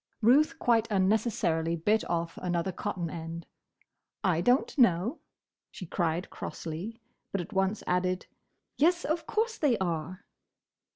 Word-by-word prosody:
Ruth 290 +8 +5
quite 230 -5 +2
unnecessarily 190 -5 +1
bit 210 +7 +2
off 170 -1 -1
another 175 +1 -1
cotton 180 -2 -3
end. 165 0 -6 0.8
"I 175 -4 +2
don't 245 - +2
know!" 235 - +3 0.5
she 185 - -8
cried 170 0 -1
crossly; 175 +9 -6 0.3
but 195 - -1
at 180 +5 -6
once 195 +2 0
added, 180 0 0 0.5
"Yes, 345 +4 +3
of 320 +2 -1
course 450 +1 0
they 270 -7 +3
are!" 175 0 -3
190 Hz, 125 wpm, -29 LUFS, 170-235 Hz, 0.8 s, Ruth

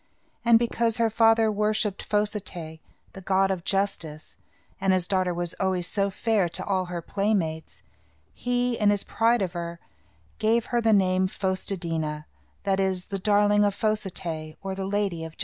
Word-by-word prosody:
And, 235 -1 +6
because 230 0 0
her 230 -1 +2
father 225 0 +4
worshipped 210 -1 0
Fos 210 0 0
i - - 0
té', 160 -4 -8 0.3
the 190 - -9
god 195 +1 +2
of 185 -3 -3
justice, 170 -6 -2 0.4
and 190 -1 +3
his 180 -1 +1
daughter 185 -2 +1
was 175 -1 -2
always 185 -2 +1
so 200 +1 0
fair 200 -2 +1
to - - -3
all 190 -2 0
her 175 -1 -5
playmates, 190 -6 -2 0.5
he, 245 -1 -1
in 210 -2 +4
his 205 -1 +2
pride 230 -1 +2
of 180 -2 -3
her, 170 -1 -5 0.6
gave 225 +1 +2
her 240 - +3
the 225 -1 +3
name 185 -2 +3
Fos 190 0 -3
te 200 - +1
dí' 165 -2 -2
na, 150 -1 -3 0.4
that 195 -1 +1
is, 190 -2 0
the 195 - -1
darling 205 +1 +3
of 205 -1 +1
Fos 215 0 0
i 190 - -4
té', 160 -3 -6
or 195 0 -3
the 190 0 -4
Lady 195 -5 -1
of 160 -1 -7
Justice. - - -28
195 Hz, 195 wpm, -26 LUFS, 180-215 Hz, 0.6 s, And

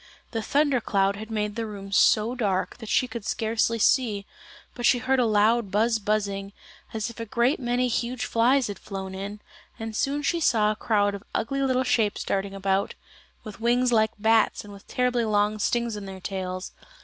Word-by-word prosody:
The 225 - -2
thunder 280 +2 +2
cloud 195 -2 +1
had 220 +1 -8
made 210 -1 -2
the 225 -1 -3
room 195 -2 -8
so 215 +3 +4
dark 200 -7 -1
that 225 -3 -9
she 255 - +2
could 235 -2 -7
scarcely 225 +1 0
see, 220 -3 +2 0.5
but 240 - -7
she 245 - +5
heard 260 +2 +1
a 245 - +3
loud 215 +1 +3
buzz 220 +3 +2
buzzing, 200 -1 -2 0.4
as 220 +1 -3
if 230 - -14
a 230 - -4
great 240 +6 +1
many 245 0 0
huge 245 +1 -2
flies 250 +3 +3
had 205 -2 -5
flown 190 -1 -6
in, 200 +2 -6 0.4
and 225 -1 -6
soon 285 +5 0
she 340 +4 +1
saw 215 -9 +3
a - - -3
crowd 205 -2 +1
of 200 0 -7
ugly 275 +5 -1
little 260 -1 +2
shapes 230 -5 +1
darting 195 0 -2
about, 195 0 0 0.5
with 215 0 -10
wings 245 +2 +2
like 220 -2 +4
bats 220 +1 +2
and 205 -1 -11
with 200 - -14
terribly 250 -1 +1
long 210 0 +1
stings 235 +1 0
in 205 -1 -7
their 190 -1 -8
tails. 185 -1 -5
220 Hz, 195 wpm, -26 LUFS, 205-240 Hz, 0.5 s, she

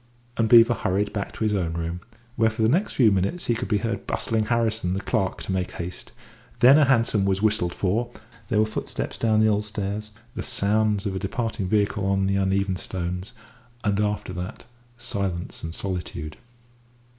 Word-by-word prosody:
And 115 -1 +1
Beevor 115 0 +8
hurried 100 +3 0
back 100 -2 -3
to - - -4
his 105 -1 +1
own 85 -5 -1
room, 85 +1 -3 0.3
where 115 -1 +3
for 110 0 -2
the - - +5
next 180 - +1
few 115 -5 +5
minutes 100 - 0
he 120 - +2
could 115 - -3
be 105 - +2
heard 105 0 -3
bustling 110 -1 0
Harrison, 110 -5 0
the - - -1
clerk, 95 -2 -1
to - - -4
make 95 -1 -2
haste; 85 +1 -6 0.5
then 135 +6 +8
a 150 - +6
hansom 115 -6 +3
was 95 +1 0
whistled 105 -5 +2
for, 110 +6 0 0.4
there 110 - +1
were 110 - +4
footsteps 110 - -5
down 110 -1 +3
the 110 - +5
old 105 -1 +2
stairs, 105 0 -4 0.2
the - - -4
sounds 105 0 +1
of 100 - -1
a - - -2
departing 105 0 -2
vehicle 105 0 +1
on 95 0 +2
the 100 0 +1
uneven 95 -1 +1
stones, 90 +3 -4 0.5
and 100 -2 +1
after 105 -3 -1
that 90 +1 -6 0.3
silence 100 -7 -3
and 80 +1 -5
solitude. 90 -5 -4
105 Hz, 190 wpm, -25 LUFS, 95-110 Hz, 0.5 s, Beevor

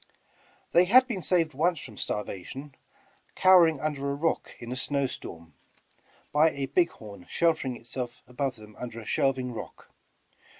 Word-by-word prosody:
They 175 +1 +6
had 255 +7 +7
been 215 -7 -3
saved 165 -2 +1
once 165 +4 +1
from 115 -5 -10
starvation, 105 +9 -4 0.6
cowering 175 -5 +6
under 140 -2 -2
a 140 - -1
rock 165 +3 -1
in 120 0 -8
a - - -2
snow 140 +1 0
storm, 85 - -8 0.8
by 155 +2 +5
a 140 -3 -3
big 170 +5 +2
horn 100 -5 -12
sheltering 160 -7 +1
itself 120 +1 -6
above 130 +1 -2
them 105 -1 -14
under 120 -2 -6
a 110 - -10
shelving 130 -1 0
rock. - - -9
135 Hz, 155 wpm, -28 LUFS, 120-165 Hz, 0.8 s, had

